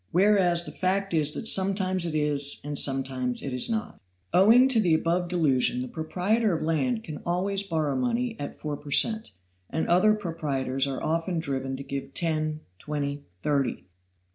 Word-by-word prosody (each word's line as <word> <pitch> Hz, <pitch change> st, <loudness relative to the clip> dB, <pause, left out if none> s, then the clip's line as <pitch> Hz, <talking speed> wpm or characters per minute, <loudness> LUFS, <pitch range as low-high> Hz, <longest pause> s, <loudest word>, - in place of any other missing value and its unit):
Whereas 180 Hz, -2 st, +3 dB
the 150 Hz, -, -8 dB
fact 195 Hz, +3 st, -1 dB
is 150 Hz, -2 st, +3 dB
that 225 Hz, -, -1 dB
sometimes 190 Hz, -2 st, +2 dB
it 155 Hz, -, -3 dB
is 145 Hz, -2 st, +4 dB
and 145 Hz, 0 st, -5 dB
sometimes 130 Hz, -2 st, -1 dB
it 135 Hz, -, -4 dB
is 125 Hz, -, +2 dB
not. 220 Hz, -1 st, -4 dB, 0.3 s
Owing 225 Hz, +8 st, +6 dB
to 245 Hz, -4 st, +3 dB
the 170 Hz, -5 st, +3 dB
above 170 Hz, +2 st, 0 dB
delusion 135 Hz, -8 st, +1 dB
the -, -, -6 dB
proprietor 180 Hz, -, 0 dB
of -, -, -5 dB
land 220 Hz, +9 st, 0 dB
can 155 Hz, -6 st, -7 dB
always 195 Hz, +3 st, -1 dB
borrow 160 Hz, -7 st, -2 dB
money 245 Hz, -2 st, -1 dB
at 145 Hz, -, -6 dB
four 150 Hz, -1 st, -5 dB
per 145 Hz, -, -12 dB
cent, 220 Hz, +9 st, +2 dB, 0.4 s
and 160 Hz, -, -2 dB
other 210 Hz, +5 st, +4 dB
proprietors 140 Hz, -8 st, -2 dB
are 135 Hz, -1 st, -4 dB
often 165 Hz, +2 st, -1 dB
driven 135 Hz, -4 st, -3 dB
to 140 Hz, -, -7 dB
give 140 Hz, 0 st, -6 dB
ten 155 Hz, -2 st, -2 dB, 0.2 s
twenty 145 Hz, +2 st, -4 dB, 0.2 s
thirty. 140 Hz, -3 st, -1 dB
165 Hz, 170 wpm, -26 LUFS, 145-195 Hz, 0.4 s, Owing